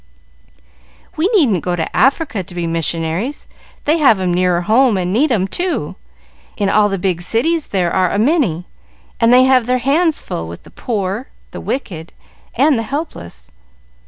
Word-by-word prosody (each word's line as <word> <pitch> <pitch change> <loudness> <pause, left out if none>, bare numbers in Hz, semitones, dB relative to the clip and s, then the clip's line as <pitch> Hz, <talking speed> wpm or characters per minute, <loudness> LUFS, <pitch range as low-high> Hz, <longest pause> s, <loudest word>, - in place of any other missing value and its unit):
"We 320 +4 +1
needn't 270 - +2
go 180 -1 -1
to 165 -2 -4
Africa 270 -5 +1
to 180 0 -12
be 175 -1 -2
missionaries; 165 - -3 0.4
they 310 +3 +2
have 265 -9 +4
'em 180 -2 0
nearer 180 -1 +1
home 225 +3 +3
and 180 0 -2
need 275 +7 +2
'em, 195 -5 +1
too. 355 - -3 0.6
In 200 -3 0
all 210 0 +3
the 195 - -2
big 180 -2 -1
cities 290 - 0
there 180 -3 -1
are 185 -1 +2
a - - -1
many, 220 - +1 0.5
and 230 0 +4
they 250 +1 +7
have 255 -2 +3
their 250 0 +2
hands 300 +6 +1
full 80 - -5
with 85 +1 -10
the - - -16
poor, 210 +2 -3 0.2
the - - -8
wicked, 170 - -5 0.4
and 275 0 +3
the 225 - -5
helpless. 85 - -6
210 Hz, 170 wpm, -17 LUFS, 175-270 Hz, 0.6 s, they